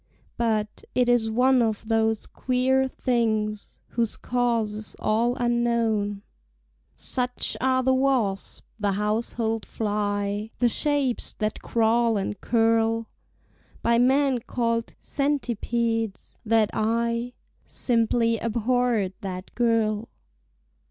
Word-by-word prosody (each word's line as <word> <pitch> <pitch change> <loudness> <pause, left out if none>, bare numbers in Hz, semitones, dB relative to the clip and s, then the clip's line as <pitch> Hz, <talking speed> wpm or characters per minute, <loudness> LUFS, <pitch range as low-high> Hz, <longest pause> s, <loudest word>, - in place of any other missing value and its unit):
But, 215 -3 -1
it 250 -1 +3
is 240 -2 +3
one 250 +3 +4
of 220 -1 -1
those 225 -1 +1
queer 260 +1 +1
things 220 -5 -1
Whose 230 -2 -1
cause 235 -3 0
is 215 0 -6
all 230 +3 +1
unknown— 230 -4 0 0.7
(Such 250 -1 -1
are 260 0 +2
the 260 +1 +3
wasp, 260 -7 0
the 205 -1 +1
household 220 +2 -1
fly, 205 0 -2
The 245 - +3
shapes 280 -1 0
that 215 0 -3
crawl 230 0 +2
and 200 +1 -3
curl 225 -1 +2 0.7
By 235 0 +3
men 265 +1 +3
called 230 0 -2
centipedes)—that 230 -5 -1
I 235 +2 0 0.3
Simply 230 -1 +1
abhorred 230 -3 0
that 185 -2 -6
girl. 225 -2 +1
230 Hz, 100 wpm, -25 LUFS, 215-245 Hz, 0.7 s, one